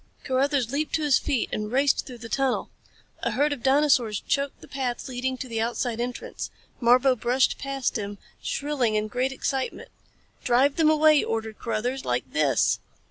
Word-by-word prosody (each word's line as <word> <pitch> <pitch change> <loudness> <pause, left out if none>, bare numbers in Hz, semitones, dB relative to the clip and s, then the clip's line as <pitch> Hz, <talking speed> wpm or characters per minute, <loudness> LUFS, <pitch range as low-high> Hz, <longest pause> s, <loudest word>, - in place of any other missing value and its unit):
Carruthers 265 -2 +1
leaped 300 +2 -1
to 315 - -1
his 290 -3 +4
feet 255 -5 0
and 210 0 -3
raced 275 +2 +2
through 250 - -8
the 230 0 -9
tunnel. 265 +2 0 0.5
A - - 0
herd 290 +2 +1
of 270 - -7
dinosaurs 265 -5 +3
choked 280 -1 -1
the - - -14
path 260 -2 -3
leading 260 0 -2
to 255 - -6
the 225 -2 -2
outside 235 0 -1
entrance. 245 0 -5 0.3
Marbo 250 +2 +5
brushed 250 +3 +1
past 275 -4 -2
him, 205 0 -5 0.2
shrilling 275 -6 -1
in 215 0 0
great 250 +5 -1
excitement. 270 0 -3 0.5
"Drive 260 +3 +3
them 320 -2 +5
away!" 310 -1 +5
ordered 220 -1 -3
Carruthers. 240 +4 -2
"Like 125 0 0
this!" 150 -3 +2
255 Hz, 170 wpm, -26 LUFS, 230-275 Hz, 0.5 s, Marbo